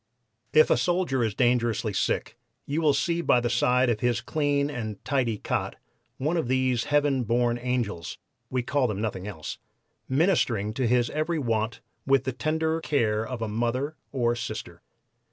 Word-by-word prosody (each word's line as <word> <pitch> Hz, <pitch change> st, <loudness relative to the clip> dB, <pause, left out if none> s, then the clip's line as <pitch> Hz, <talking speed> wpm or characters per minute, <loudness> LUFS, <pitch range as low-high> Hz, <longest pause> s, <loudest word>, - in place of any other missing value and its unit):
If 155 Hz, 0 st, +5 dB
a -, -, +5 dB
soldier 175 Hz, -8 st, +1 dB
is 110 Hz, -3 st, -1 dB
dangerously 120 Hz, -3 st, +1 dB
sick -, -, -1 dB, 0.3 s
you 150 Hz, +4 st, -1 dB
will 150 Hz, -3 st, +4 dB
see 170 Hz, +4 st, 0 dB
by 125 Hz, -, +4 dB
the 120 Hz, 0 st, -1 dB
side 125 Hz, +1 st, +3 dB
of 115 Hz, -3 st, +1 dB
his 120 Hz, -2 st, +1 dB
clean 145 Hz, -2 st, 0 dB
and 115 Hz, -8 st, -4 dB
tidy 125 Hz, -6 st, 0 dB
cot -, -, -2 dB, 0.4 s
one 155 Hz, +6 st, 0 dB
of 160 Hz, -, -1 dB
these 130 Hz, -2 st, +1 dB
heaven 145 Hz, -3 st, +2 dB
born 120 Hz, +1 st, +1 dB
'angels' 120 Hz, -9 st, -2 dB, 0.3 s
(we 130 Hz, -1 st, -1 dB
call 135 Hz, +1 st, +1 dB
them 105 Hz, -3 st, -3 dB
nothing 105 Hz, -3 st, -3 dB
else), 80 Hz, -7 st, -6 dB, 0.5 s
ministering 130 Hz, -, +2 dB
to 125 Hz, +1 st, 0 dB
his 120 Hz, 0 st, +2 dB
every 155 Hz, +3 st, -1 dB
want 115 Hz, -4 st, -1 dB, 0.3 s
with 135 Hz, -1 st, +4 dB
the 130 Hz, -, -2 dB
tender 160 Hz, +4 st, 0 dB
care 110 Hz, -9 st, +1 dB
of 115 Hz, 0 st, -4 dB
a -, -, -1 dB
mother 120 Hz, +7 st, -1 dB, 0.2 s
or 120 Hz, -3 st, +1 dB
sister. 120 Hz, -, -6 dB
125 Hz, 170 wpm, -26 LUFS, 115-145 Hz, 0.5 s, If